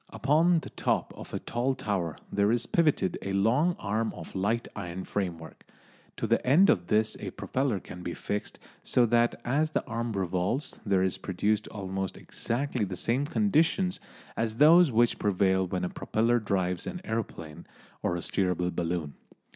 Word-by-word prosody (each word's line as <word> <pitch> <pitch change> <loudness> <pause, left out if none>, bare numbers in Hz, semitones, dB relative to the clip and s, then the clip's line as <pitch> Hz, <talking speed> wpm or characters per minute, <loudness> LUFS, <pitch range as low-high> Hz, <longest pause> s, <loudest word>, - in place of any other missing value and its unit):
Upon 160 +5 +3
the - - -10
top - - -1
of - - -10
a - - -2
tall 125 +3 -1
tower 95 - -2 0.2
there 100 +1 +3
is 120 0 +1
pivoted 150 - +1
a 95 - -3
long 125 - +3
arm 110 +2 -1
of 80 - -9
light 105 +5 0
iron 95 -2 -5
framework. 85 -6 -4 0.5
To - - -2
the - - +2
end 160 +10 +6
of 90 -1 0
this 110 +1 +2
a - - -4
propeller 130 -6 -1
can 90 0 -10
be 90 -1 -4
fixed, 105 0 -4 0.2
so 125 - +3
that 120 +1 +3
as 150 +6 +1
the - - -1
arm 115 -1 -3
revolves 95 - -1
there 95 -2 +3
is 95 - -1
produced 105 +3 0
almost 95 -2 -4
exactly 125 -1 -2
the 95 -2 -3
same 125 +10 0
conditions 180 -1 +2 0.4
as 115 -1 -1
those 160 +4 +7
which 120 +1 +2
prevail 95 -2 +2
when 90 0 -2
a 90 - -1
propeller 115 +2 +1
drives 95 -4 -1
an 180 - -5
aeroplane 85 - -5 0.3
or 85 - 0
steerable 90 0 -1
balloon. 85 -4 -2
105 Hz, 165 wpm, -28 LUFS, 95-125 Hz, 0.5 s, those